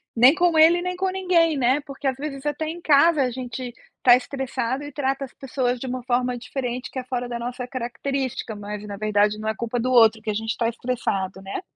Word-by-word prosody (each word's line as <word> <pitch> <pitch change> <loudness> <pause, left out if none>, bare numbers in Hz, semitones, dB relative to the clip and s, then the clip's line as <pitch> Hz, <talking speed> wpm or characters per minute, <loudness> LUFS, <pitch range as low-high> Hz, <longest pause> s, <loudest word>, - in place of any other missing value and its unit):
nem 250 +5 +7
com 345 -2 +2
ele 340 +2 +6
nem 365 0 -2
com 380 +1 0
ninguém 350 -5 +2
né, 260 +3 +2
porque 280 -1 -6
às 265 - +1
vezes 275 -1 -6
até 300 +1 -2
em 340 +1 -6
casa 305 0 +5
a 250 - 0
gente 250 0 -6 0.3
tá 245 -1 +8
estressado 260 0 -3
e 290 - -8
trata 275 -1 -1
as 265 - -16
pessoas 255 -2 -2
de 260 - -5
uma 255 0 -3
forma 250 0 0
diferente 250 0 -4
que 260 - -4
é - - -5
fora 250 -1 -3
da 240 - -3
nossa 245 +1 -5
característica, 260 -1 -3
mas 205 0 -6
na 200 - -5
verdade 210 0 +2
não 215 0 -2
é 220 - -1
culpa 235 +1 -3
do 255 +2 0
outro 225 -3 +5
que 215 - -5
a - - -2
gente 225 +1 -2
está 230 0 0
estressado, 205 -6 -3
né. 195 - -5
255 Hz, 230 wpm, -23 LUFS, 235-280 Hz, 0.3 s, tá